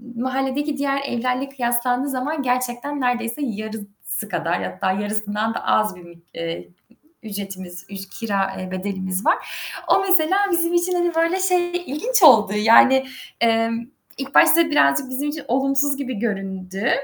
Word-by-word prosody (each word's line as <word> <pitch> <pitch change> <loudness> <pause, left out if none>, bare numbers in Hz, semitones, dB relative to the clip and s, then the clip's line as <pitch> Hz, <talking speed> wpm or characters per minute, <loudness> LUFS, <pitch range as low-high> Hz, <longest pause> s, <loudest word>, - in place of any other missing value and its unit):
mahalledeki 270 +4 -2
diğer 275 0 0
evlerle 255 +2 -2
kıyaslandığı 250 0 0
zaman 280 +4 -2
gerçekten 250 +3 -2
nerdeyse 240 +1 -1
yarısı 215 -2 -6
kadar, 170 0 -1
hatta 190 - -2
yarısından 210 +2 -2
da - - -5
az 215 -3 +2
bir, 170 -1 -14 0.2
eee, 165 0 -5 0.6
ücretimiz, 195 -4 -7
üc 195 -1 -7
kira, 195 -3 -1
eee, 185 0 -6
bedelimiz 190 0 -3
var. - - +4 0.5
O - - +4
mesela 375 0 +4
bizim 340 0 +1
için 345 +1 +1
hani 350 -1 0
böyle 335 +3 +1
şey 360 -2 +1
ilginç 405 - 0
oldu 220 -8 +7
yani, 230 +5 +5 0.4
emm, 230 0 +1 0.3
ilk 275 0 -7
başta 330 -1 +6
birazcık 200 - +3
bizim 275 +3 -2
için 300 0 -5
olumsuz 275 +2 +1
gibi 255 -6 -4
göründü 195 -2 -3
245 Hz, 140 wpm, -21 LUFS, 205-280 Hz, 0.6 s, oldu